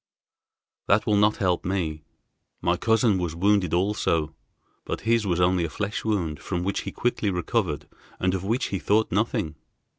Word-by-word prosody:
"That 105 +3 +3
will 105 -3 +2
not 105 +1 +3
help 90 -3 +1
me. 85 -5 -2 0.6
My 85 - +1
cousin 110 -1 +2
was 85 -3 -2
wounded 100 -1 +2
also, 85 -4 +1 0.5
but - - -4
his 115 -2 +2
was 90 -2 +1
only 90 0 +3
a 85 - -2
flesh 105 +5 -3
wound 90 -9 -1
from 90 -2 -3
which 100 +2 -1
he - - -9
quickly 120 -3 0
recovered 90 - -1 0.3
and 90 0 +1
of 95 -1 -2
which 115 +6 0
he 95 - -2
thought 110 +4 +2
nothing. 95 -6 0
95 Hz, 170 wpm, -25 LUFS, 85-105 Hz, 0.6 s, That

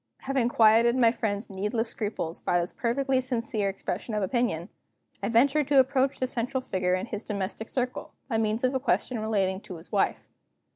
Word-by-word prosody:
Having 265 -3 0
quieted 230 +1 +5
my 235 -3 +5
friend's 215 -3 -2
needless 210 +4 -2
scruples 205 -8 -4
by 175 - +1
this 175 +1 -3
perfectly 260 +2 0
sincere 230 -5 -1
expression 200 +3 -4
of 210 - 0
opinion, 190 -5 -1 0.5
I 200 - -1
ventured 275 +5 +3
to 280 -1 +5
approach 265 +1 +2
the 255 - +1
central 250 +1 -2
figure 185 -6 0
in 185 - -3
his 215 -2 -5
domestic 210 +1 -4
circle, 250 -1 -3 0.2
by 225 -4 0
means 220 +2 0
of 255 +1 +2
a 265 - +1
question 255 -2 0
relating 195 -3 0
to 185 - -9
his 165 - -12
wife. 200 -3 0
225 Hz, 185 wpm, -27 LUFS, 200-255 Hz, 0.5 s, quieted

